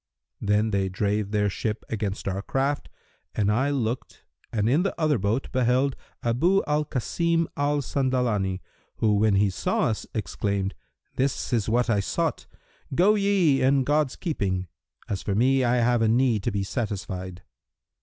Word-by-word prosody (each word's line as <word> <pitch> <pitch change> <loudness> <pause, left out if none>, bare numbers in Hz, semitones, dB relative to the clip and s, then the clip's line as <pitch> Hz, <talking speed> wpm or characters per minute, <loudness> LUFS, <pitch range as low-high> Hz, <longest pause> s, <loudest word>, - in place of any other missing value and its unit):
Then 105 +2 +2
they 95 -1 0
drave 100 +2 -1
their 105 0 +1
ship 105 +2 -3
against 105 -3 -3
our 95 0 -1
craft 135 +6 -1 0.5
and 105 -1 +2
I 130 +7 +1
looked 125 -3 -3 0.3
and 110 -2 0
in 140 +8 +3
the 195 -2 -2
other 155 -6 +2
boat 105 +7 -1
beheld 130 +2 +2 0.3
Abu 165 +12 +2
al 150 0 +1
Kasim 165 +5 0
al 145 0 0
Sandalani 120 -9 0 0.3
who 110 -2 +2
when 105 0 +3
he 100 0 +3
saw - - -1
us 110 - -3
exclaimed 100 0 -2 0.4
'This 135 -1 -1
is 115 -3 +1
what 120 +2 +2
I 110 -4 +2
sought: 100 - -2 0.5
go 190 +7 +5
ye 195 -9 +3
in 135 +1 +3
God's 145 0 +1
keeping; 95 - -2 0.4
as 100 - -3
for 100 - -2
me, 130 +4 +3
I 120 0 +2
have 120 -1 +2
a 115 - +3
need 115 -1 +3
to 120 - +1
be 100 -1 -1
satisfied!' 95 -4 -4
115 Hz, 160 wpm, -25 LUFS, 100-135 Hz, 0.5 s, go